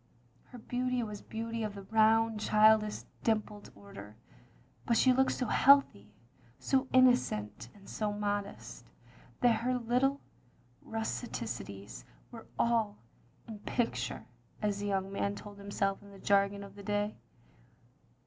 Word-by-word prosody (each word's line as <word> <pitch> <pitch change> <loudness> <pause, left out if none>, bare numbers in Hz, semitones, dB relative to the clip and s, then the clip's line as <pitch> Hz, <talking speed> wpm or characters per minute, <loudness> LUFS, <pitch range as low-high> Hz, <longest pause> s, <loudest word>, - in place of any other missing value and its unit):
Her 250 - -12
beauty 250 +1 -2
was 210 -2 -6
beauty 230 +1 -5
of 210 -2 -3
the 200 - -8
round, 220 +1 +3
childish, 215 0 +4 0.2
dimpled 215 -2 -1
order; 195 - -12 0.7
but 235 - +3
she 255 +2 +5
looked 265 +1 +2
so 250 - -2
healthy, 270 - +4 0.5
so 265 -1 0
in 255 0 +7
nocent 105 - 0
and 200 -1 -17
so 210 -1 -2
modest, 205 -1 -4 0.6
that 240 -2 +4
her 250 +1 0
little 250 +4 +1 0.6
rusticities 220 - -5 0.3
were 230 -2 -11
all 225 -3 +1 0.5
"in 225 - -7
the 210 - -10
picture, 235 +3 -2 0.2
" - - -30
as 205 -1 0
the 205 - -3
young 195 -1 -1
man 200 0 -1
told 205 -1 -11
himself 200 -1 -2
in 200 - -15
the 200 - -13
jargon 200 0 +1
of 200 -1 -11
the 200 - -11
day. 205 +1 -1
210 Hz, 140 wpm, -32 LUFS, 200-235 Hz, 0.7 s, in